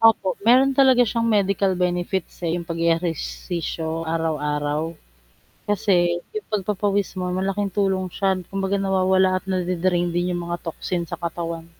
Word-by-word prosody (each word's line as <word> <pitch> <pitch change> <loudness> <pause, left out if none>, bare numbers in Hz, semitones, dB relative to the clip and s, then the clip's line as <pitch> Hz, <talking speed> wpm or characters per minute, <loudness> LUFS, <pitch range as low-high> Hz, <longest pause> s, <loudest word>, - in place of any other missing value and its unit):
Opo, 225 -4 +4
meron 255 +5 +5
talaga 260 -2 +5
siyang 230 0 0
medical 195 -2 +2
benefits, 180 +1 -2
eh, 170 0 -1
'yong 170 - -4
pag-ehersisyo 165 0 -2
araw-araw. 155 0 -1 0.7
Kasi 175 -4 +2
'yong 430 -1 -6
pagpapawis 200 -1 -1
mo 180 0 -2
malaking 195 +2 -1
tulong 190 -2 +1
siya, 195 -1 +1
d 180 - -10
kumbaga 195 0 -1
nawawala 190 -1 +2
at - - -28
nade-drain 180 -1 0
din 175 +1 0
'yong 175 -1 -2
mga 175 0 -3
toxin 170 +1 -3
sa 170 - -6
katawan. 170 -1 -4
185 Hz, 140 wpm, -23 LUFS, 170-195 Hz, 0.7 s, meron